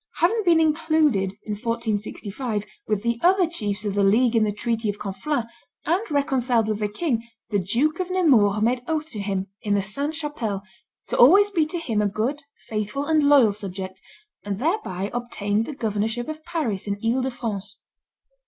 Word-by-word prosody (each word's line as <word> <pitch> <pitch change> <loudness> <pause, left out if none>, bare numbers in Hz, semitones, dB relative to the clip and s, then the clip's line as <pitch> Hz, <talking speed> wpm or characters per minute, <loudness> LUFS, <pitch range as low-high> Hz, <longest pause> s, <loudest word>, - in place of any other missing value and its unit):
Having 405 +7 +2
been 335 -2 +5
included, 310 - +2
in 215 - -6
1465, 215 0 -3 0.2
with 210 -1 0
the 235 0 0
other 370 +1 +5
chiefs 210 - -3
of 205 - -1
the 200 0 +2
league 230 +5 +4
in 225 - +4
the 210 - +1
treaty 225 +1 -1
of 205 - -2
Conflans, 215 +7 -2 0.4
and 345 +6 +2
reconciled 255 -6 +1
with 215 -1 -1
the 210 - 0
king, 235 +2 -1 0.3
the 205 - +2
Duke 250 - +1
of 370 0 -2
Nemours 235 - +4
made 245 +2 +2
oath 315 -1 -2
to 215 - -5
him, 195 -1 -2 0.2
in 205 -1 +1
the 200 - +2
Sainte 280 +10 -3
Chapelle, 240 -11 -3 0.5
to - - -1
always 395 +11 +7
be 325 -6 +2
to 345 - -4
him 235 -11 -1
a 210 - +2
good, 230 +9 -2 0.2
faithful, 215 +6 -3
and 315 0 +3
loyal 280 -7 +5
subject, 190 -2 -6 0.4
and 200 -1 -3
thereby 230 - -1
obtained 225 -3 -1
the 300 - -5
governorship 220 0 -2
of 310 0 -6
Paris 275 - -2
and 200 0 -1
Ile 240 +3 +2
de 260 - 0
France. 210 -5 -5
230 Hz, 180 wpm, -24 LUFS, 205-300 Hz, 0.5 s, always